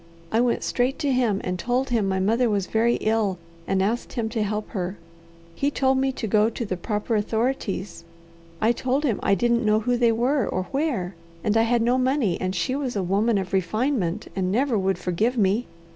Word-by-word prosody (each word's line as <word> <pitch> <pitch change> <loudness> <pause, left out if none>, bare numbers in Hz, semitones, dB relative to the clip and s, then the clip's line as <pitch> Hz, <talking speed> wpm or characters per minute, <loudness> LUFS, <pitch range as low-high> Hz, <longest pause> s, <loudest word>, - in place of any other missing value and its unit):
I 225 - +3
went 245 -1 +1
straight 255 +2 0
to 285 -2 0
him, 235 -6 +1
and 180 0 -3
told 250 +6 0
him 220 -5 +2
my 190 0 0
mother 225 +5 +2
was 200 -3 0
very 230 +4 +2
ill, 215 -4 +1 0.3
and 190 0 +1
asked 230 +5 -2
him 230 -3 -2
to 225 -1 -2
help 210 0 -2
her. 185 -2 -4 0.6
He 275 +11 0
told 265 -2 +1
me 270 0 +1
to 240 - -4
go 215 +1 +3
to 235 +1 -4
the 190 - -2
proper 210 +5 -2
authorities. 210 -5 -2 0.6
I 220 - +3
told 260 +4 -1
him 240 -9 0
I 200 - +3
didn't 235 +4 +1
know 215 0 +3
who 245 +2 +1
they 235 -1 +4
were 245 +2 +1
or 185 - -1
where, 270 - -1 0.3
and 210 - +1
I 225 - +5
had 240 -1 +3
no 245 +2 +2
money 255 -8 +1
and 185 +1 -1
she 255 +8 -1
was 270 -4 -3
a 195 - 0
woman 205 +5 +2
of 190 -1 -4
refinement, 200 -1 0
and 185 -1 0
never 250 +3 +1
would 190 -2 +1
forgive 210 +8 0
me. 210 +3 +2
225 Hz, 210 wpm, -24 LUFS, 195-250 Hz, 0.6 s, I